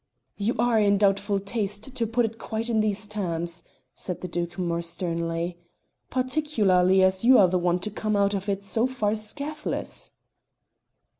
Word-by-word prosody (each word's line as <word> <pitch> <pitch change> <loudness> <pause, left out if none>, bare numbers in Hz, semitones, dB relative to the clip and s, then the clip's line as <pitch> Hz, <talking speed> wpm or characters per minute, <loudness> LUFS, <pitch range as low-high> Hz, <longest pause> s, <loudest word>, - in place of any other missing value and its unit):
"You 215 +4 0
are 235 0 +3
in 200 -1 +4
doubtful 200 0 +2
taste 205 +3 -3
to 235 -3 -1
put 235 +2 +2
it 225 0 -6
quite 225 +1 -3
in 220 - +2
these 215 -1 0
terms," 175 -5 -3 0.3
said 180 - -5
the 180 - -4
Duke 175 0 -3
more 170 -2 -1
sternly, 170 0 -3 0.5
"particularly 215 -9 +2
as 190 +1 +2
you 255 +2 +7
are 190 - +7
the 180 +1 +1
one 175 0 +2
to 210 - -3
come 215 +1 -1
out 200 0 +2
of 200 0 -3
it 200 0 -2
so 225 +4 +1
far 220 -5 -1
scathless." 285 +8 -3
200 Hz, 165 wpm, -26 LUFS, 180-225 Hz, 0.5 s, you